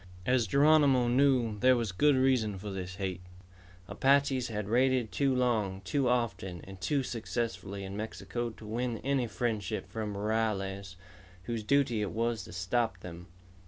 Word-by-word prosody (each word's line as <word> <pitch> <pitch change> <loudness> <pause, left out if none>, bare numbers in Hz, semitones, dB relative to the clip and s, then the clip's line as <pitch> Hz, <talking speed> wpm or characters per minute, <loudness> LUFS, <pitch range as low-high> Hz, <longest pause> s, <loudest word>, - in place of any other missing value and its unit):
As 125 -3 +2
Geronimo 140 -1 +4
knew, 125 -4 +2
there 130 +2 +5
was 115 -4 -1
good 145 +9 +3
reason 130 -6 +2
for 100 +2 -6
this 95 -1 -5
hate. 95 -2 -4 0.7
Apaches 135 -1 +2
had 105 -3 -4
raided 125 -1 +2
too 135 +8 +1
long, 110 -7 0
too 130 +6 0
often, 100 -7 -1
and 95 -1 -11
too 135 +9 0
successfully 115 -4 -4
in 95 0 -6
Mexico 110 +2 -4
to 110 -1 -13
win 115 +2 -2
any 135 -2 +1
friendship 110 -2 -2
from 105 -2 -4
rurales 100 -3 -2 0.5
whose 115 +3 -3
duty 120 -1 +2
it 105 - -1
was 115 -2 -1
to - - -11
stop 95 +2 -1
them. 90 0 -9
115 Hz, 155 wpm, -30 LUFS, 100-125 Hz, 0.7 s, there